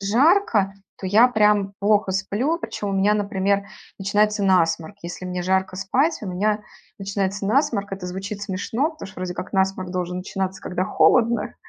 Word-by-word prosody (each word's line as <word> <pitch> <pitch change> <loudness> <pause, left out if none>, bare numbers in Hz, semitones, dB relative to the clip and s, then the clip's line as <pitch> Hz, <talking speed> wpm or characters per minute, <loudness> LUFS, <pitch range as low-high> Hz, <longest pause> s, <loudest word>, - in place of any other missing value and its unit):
жарко, 225 - +3 0.3
то 190 - -5
я 215 +6 +6
прям 210 -3 +2
плохо 205 -1 +2
сплю, 205 - 0
причём 205 -10 -4
у - - -2
меня, 200 +2 +3
например, 200 -1 0 0.3
начинается 210 +1 +1
насморк, 170 -1 +2
если 175 +2 -7
мне 180 0 -3
жарко 190 0 0
спать, 270 - +1
у - - -5
меня 210 +4 0 0.4
начинается 195 0 -2
насморк. 225 -5 +1
Это 190 -2 -5
звучит 195 +3 -5
смешно, 220 - -1
потому 315 - -9
что - - -15
вроде 180 -1 -3
как 185 - -6
насморк 190 -1 0
должен 180 0 -3
начинаться, 190 +1 -4
когда 180 0 -2
холодно. 230 +1 +2
200 Hz, 165 wpm, -23 LUFS, 190-210 Hz, 0.4 s, я